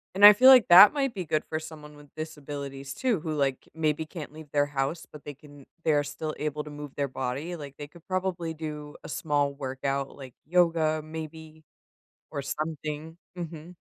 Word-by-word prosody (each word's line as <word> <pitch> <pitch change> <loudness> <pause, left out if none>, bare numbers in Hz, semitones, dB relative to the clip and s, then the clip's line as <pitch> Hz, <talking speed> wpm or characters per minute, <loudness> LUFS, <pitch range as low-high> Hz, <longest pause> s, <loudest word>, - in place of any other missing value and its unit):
And 200 - +4
I 205 - +13
feel 255 +6 +6
like 255 -4 +8
that 185 +4 +10
might 275 -4 -1
be 185 -3 -4
good 155 -1 0
for 155 - -2
someone 155 -2 -11
with 145 -1 -17
disabilities 140 -3 -6
too, 240 - 0
who, 160 -1 -4
like, 140 -3 -1
maybe 160 -1 0
can't 155 -2 -8
leave 155 -1 -12
their 145 0 +2
house, 145 +3 -3
but 150 - -12
they 145 - -7
can 145 0 -16 0.2
they 160 - +3
are 145 -1 +3
still 150 +2 -5
able 150 0 -3
to 150 - -9
move 145 -1 -9
their 140 -1 0
body. 135 +6 -4
Like, 145 -4 -9
they 145 - -6
could 160 +3 -18
probably 185 -3 -2
do 150 -2 -7
a - - -8
small 145 -2 0
workout, 135 0 -3
like, 130 -3 -11
yoga 165 -2 +2
maybe 160 0 -9 0.7
or 140 - -3
something. 155 +2 -4 0.2
Mhm. 170 0 -7
155 Hz, 195 wpm, -27 LUFS, 145-160 Hz, 0.7 s, I